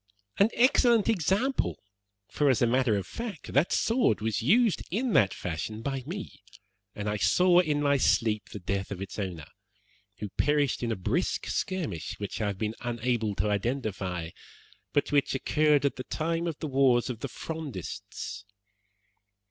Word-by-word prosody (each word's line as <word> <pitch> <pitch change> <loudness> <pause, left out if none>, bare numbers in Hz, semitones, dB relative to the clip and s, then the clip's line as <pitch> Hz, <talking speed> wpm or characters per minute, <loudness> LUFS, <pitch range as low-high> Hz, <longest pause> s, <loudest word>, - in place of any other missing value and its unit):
"An 200 +3 +6
excellent 240 -3 +4
example, 210 - +1 0.5
for, 145 -1 +1
as 130 - +3
a - - +4
matter 120 -2 +2
of 95 - -3
fact, 210 - -7
that 140 +6 +3
sword 225 - +2
was 110 +1 -1
used 215 - +3
in 230 +5 -1
that 100 -3 +5
fashion 90 +6 -5
by 135 0 -2
me, 190 +4 -7 0.5
and 105 0 -4
I 105 0 0
saw 175 - +4
in 150 -4 +1
my 140 -1 +3
sleep 110 -4 +1
the - - -7
death 95 +1 -3
of 100 - -5
its 95 +2 -6
owner, 90 -6 -4 0.7
who 105 - -5
perished 145 -3 +2
in 120 -1 -1
a - - 0
brisk 95 - -1
skirmish, 100 - -3
which 100 +1 -5
I 105 - +1
have 100 -2 -3
been 110 +1 -2
unable 120 -3 -1
to 105 - 0
identify, 100 -7 -2 0.6
but 145 - 0
which 145 -2 +2
occurred 150 +1 +2
at 140 - 0
the 130 - -4
time 165 +4 -2
of 160 -3 -3
the 155 - -4
wars 130 -3 +3
of 115 - -7
the 140 - -4
Frondists. 150 - -6
130 Hz, 165 wpm, -28 LUFS, 105-160 Hz, 0.7 s, An